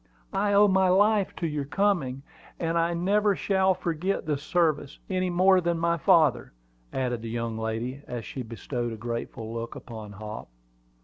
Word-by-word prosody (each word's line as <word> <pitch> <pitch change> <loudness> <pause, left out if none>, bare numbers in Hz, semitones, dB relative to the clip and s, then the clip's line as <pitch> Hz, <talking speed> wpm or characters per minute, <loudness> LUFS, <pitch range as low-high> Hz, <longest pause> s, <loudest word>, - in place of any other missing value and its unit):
"I 205 +1 +1
owe 205 +1 +7
my 190 -1 +3
life 205 +1 +3
to 170 - -3
your 150 -2 -2
coming; 145 -6 0 0.4
and 165 0 -1
I 170 0 +1
never 200 +4 +2
shall 190 -1 +2
forget 175 +4 -2
this 150 -2 -1
service, 155 -3 0
any 185 -1 0
more 185 +1 +4
than 170 -1 0
my 170 0 +1
father," 155 -4 +3 0.4
added 125 -3 -2
the 115 - -6
young 115 0 -3
lady, 115 +4 -3
as 120 -3 -5
she 130 - -6
bestowed 120 0 -4
a - - -7
grateful 115 0 -5
look 115 0 -5
upon 110 -4 -9
Hop. 105 +2 -7
155 Hz, 170 wpm, -27 LUFS, 120-185 Hz, 0.4 s, owe